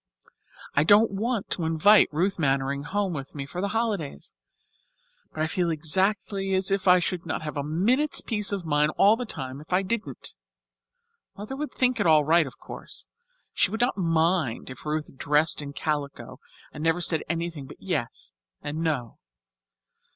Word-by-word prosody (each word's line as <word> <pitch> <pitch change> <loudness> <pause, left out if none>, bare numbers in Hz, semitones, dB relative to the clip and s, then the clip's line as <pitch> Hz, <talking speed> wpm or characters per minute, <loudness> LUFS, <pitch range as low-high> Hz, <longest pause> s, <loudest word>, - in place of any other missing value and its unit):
I 145 - +3
don't 210 +6 +5
want 220 +2 -2
to 175 - -1
invite 165 +6 +5
Ruth 180 +5 0
Mannering 140 -1 0
home 195 +5 -2
with 140 -2 -7
me 140 -2 -4
for 155 +6 -5
the 200 - 0
holidays, 200 - -3 1.0
but 155 - -2
I - - +2
feel 170 +2 0
exactly 195 +4 0
as 190 +1 +1
if 195 -1 0
I 180 0 +8
should 180 0 -2
not 160 -1 -4
have 150 - -5
a 145 - -1
minute's 225 - +2
peace 210 -4 -1
of 195 -4 -3
mind 150 0 +2
all 205 +3 +6
the 245 0 -5
time 130 -5 -4
if 155 - -16
I 185 +2 +3
didn't. 220 +3 -4 1.0
Mother 210 +6 -6
would 300 +2 -4
think 255 -1 +1
it - - +2
all 155 -2 +6
right, 165 0 +4
of 130 - -11
course. - - -8 0.5
She - - +2
would 220 +4 -3
not 245 +2 +2
mind 165 - 0
if 130 +4 -10
Ruth 150 -2 -3
dressed 150 +3 +2
in 140 -1 -6
calico 145 -1 -4 0.3
and 150 - -7
never 165 +1 +2
said 165 -2 +2
anything 165 -4 -3
but - - -12
yes - - -4 0.3
and 145 +2 -4
no. 150 -8 -2
170 Hz, 175 wpm, -26 LUFS, 150-200 Hz, 1.0 s, I